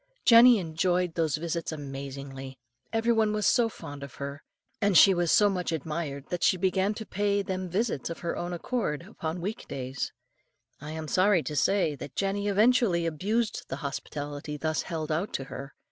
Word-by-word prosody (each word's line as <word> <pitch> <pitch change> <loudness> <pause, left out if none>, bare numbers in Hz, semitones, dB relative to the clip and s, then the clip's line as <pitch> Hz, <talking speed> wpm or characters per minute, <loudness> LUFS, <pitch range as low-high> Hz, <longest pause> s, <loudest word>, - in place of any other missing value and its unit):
Jenny 235 +1 +8
enjoyed 175 0 0
those 160 -3 0
visits 170 +1 -3
amazingly; 135 -2 -7 0.3
every 225 +1 +2
one 220 -2 +2
was 210 -1 0
so 235 -2 +4
fond 145 -9 -9
of 140 -1 -9
her, 140 +1 -6 0.4
and 200 -4 +4
she 195 +4 +8
was 175 -2 +1
so 210 - +6
much 180 -4 -1
admired, 150 -2 -3
that 175 -1 -3
she 185 - +4
began 190 +3 +1
to 220 - -6
pay 200 0 0
them 185 -1 -3
visits 195 - -1
of 165 - -6
her 170 - -2
own 175 0 -4
accord 175 - -2
upon 170 -4 -5
weekdays. 140 -9 -4 0.7
I 150 - -7
am 160 0 -5
sorry 185 0 +3
to 150 - -4
say 185 +1 +2
that 140 +1 -9
Jenny 200 +1 -1
eventually 205 -4 +3
abused 210 +8 -1
the - - -4
hospitality 145 +1 -5
thus 155 +2 -1
held 160 -2 -4
out 170 +7 -1
to 135 - -2
her. 135 +1 -8
170 Hz, 175 wpm, -28 LUFS, 150-200 Hz, 0.7 s, Jenny